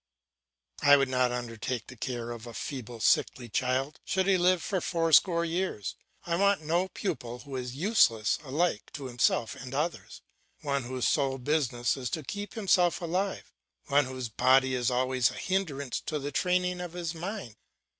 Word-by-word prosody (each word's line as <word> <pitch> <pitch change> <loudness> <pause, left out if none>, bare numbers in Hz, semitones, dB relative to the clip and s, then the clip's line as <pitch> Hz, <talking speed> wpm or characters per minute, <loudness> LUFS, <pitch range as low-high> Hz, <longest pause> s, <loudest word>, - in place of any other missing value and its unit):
I 145 0 +7
would 135 -1 +1
not 125 -1 +2
undertake 120 0 -4
the 130 - -11
care 120 0 -4
of 120 0 -8
a 115 - -9
feeble, 120 -4 -6
sickly 120 +3 +2
child, 130 +5 -1
should 190 0 0
he 195 0 +4
live 180 -1 +2
to 190 -3 0
four 165 -2 0
score 170 +1 +5
years. 170 - -2 0.3
I 170 -1 0
want 200 -3 +3
no 170 +4 +1
pupil 145 - -4
who 135 +2 -9
is 125 -1 -4
useless 140 - +3
alike 150 -3 -1
to 140 -3 -6
himself 120 -2 +1
and 130 +1 -7
others, 155 +4 -3 0.4
one 140 -3 -1
whose 130 0 -1
sole 135 -2 +1
business 125 -4 0
is 125 -2 -3
to 155 - -8
keep 205 +8 -6
himself 185 -5 +3
alive, 185 +3 -2 0.4
one 145 0 +4
whose 130 -1 -5
body 130 +3 +3
is 125 -1 +1
always 130 -1 +2
a - - -8
hindrance 155 -9 -2
to 155 - -1
the 145 0 -4
training 180 +3 +1
of 175 -2 -6
his 175 -2 -3
mind. 170 - -6
140 Hz, 175 wpm, -29 LUFS, 125-175 Hz, 0.4 s, I